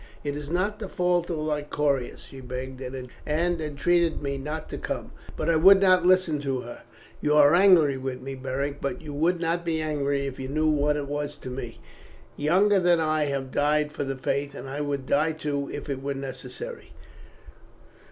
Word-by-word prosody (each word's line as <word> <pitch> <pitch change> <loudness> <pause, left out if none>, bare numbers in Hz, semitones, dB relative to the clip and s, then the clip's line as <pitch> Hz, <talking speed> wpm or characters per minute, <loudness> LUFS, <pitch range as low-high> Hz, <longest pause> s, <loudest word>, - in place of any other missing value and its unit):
"It 145 -1 -2
is 145 -1 -6
not 195 +5 0
the 205 -4 -5
fault 180 -1 +1
of 170 - -2
Lycoris. 150 -3 -1
She 135 - -11
begged 130 +1 -6
and 130 0 -6 0.2
entreated 165 +1 +1
me 140 -1 -1
not 150 +3 -5
to - - -5
come, - - -4 0.3
but - - -2
I 165 - +4
would 190 +4 +8
not 185 -2 +5
listen 185 -5 +3
to 135 -3 -2
her. 120 - -9 0.4
You 150 0 +2
are 145 0 +7
angry 175 -7 +6
with 130 -1 -4
me, 135 +2 -6
Beric, 135 +2 -3
but 160 +5 -3
you 150 -2 -7
would 165 +5 +1
not 170 +1 -1
be 165 -2 -1
angry 145 -3 -1
if 135 -1 -6
you 130 - -4
knew 155 +3 0
what 150 0 +2
it 145 - -3
was 145 0 -3
to 130 - -8
me. 120 -2 -6 0.6
Younger 190 +7 +3
than 175 -2 +4
I 155 -1 +1
have 135 -2 -3
died 150 +1 +1
for - - -3
the 135 -1 -3
Faith, 140 +2 -2
and 135 - -7
I 140 +2 -4
would 140 -2 -2
die 155 +4 +2
too 145 -2 -3
if 145 - -6
it 135 -2 -3
were 140 0 -3
necessary." 135 - -7
150 Hz, 195 wpm, -26 LUFS, 140-165 Hz, 0.6 s, would